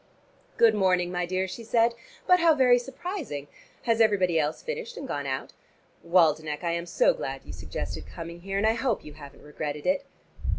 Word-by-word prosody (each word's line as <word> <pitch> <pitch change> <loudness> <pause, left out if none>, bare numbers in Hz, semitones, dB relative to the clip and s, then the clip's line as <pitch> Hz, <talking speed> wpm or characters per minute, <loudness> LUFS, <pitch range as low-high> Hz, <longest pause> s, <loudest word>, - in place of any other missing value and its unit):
"Good 230 -2 +6
morning, 180 -3 +2
my 180 -1 -1
dear," 185 +1 -1
she 210 +5 -7
said, 230 +1 +3 0.3
"but 360 0 +5
how 330 -2 +5
very 250 -3 +5
surprising. 265 - -5 0.4
Has 230 -1 +2
everybody 190 -6 +3
else 150 +1 -1
finished 475 0 -5
and 280 - -6
gone 145 - -3
out? 130 0 -3 0.5
Waldenech, 160 -3 +2
I 170 - 0
am 170 +1 -3
so - - +3
glad - - -5
you - - -8
suggested - - -6
coming 170 0 -8
here, 195 +2 -3
and 200 - +1
I 220 - +4
hope 230 -1 -1
you 150 - -9
haven't 145 -2 -13
regretted 150 0 -5
it." 280 +1 +2
190 Hz, 185 wpm, -27 LUFS, 160-245 Hz, 0.5 s, Good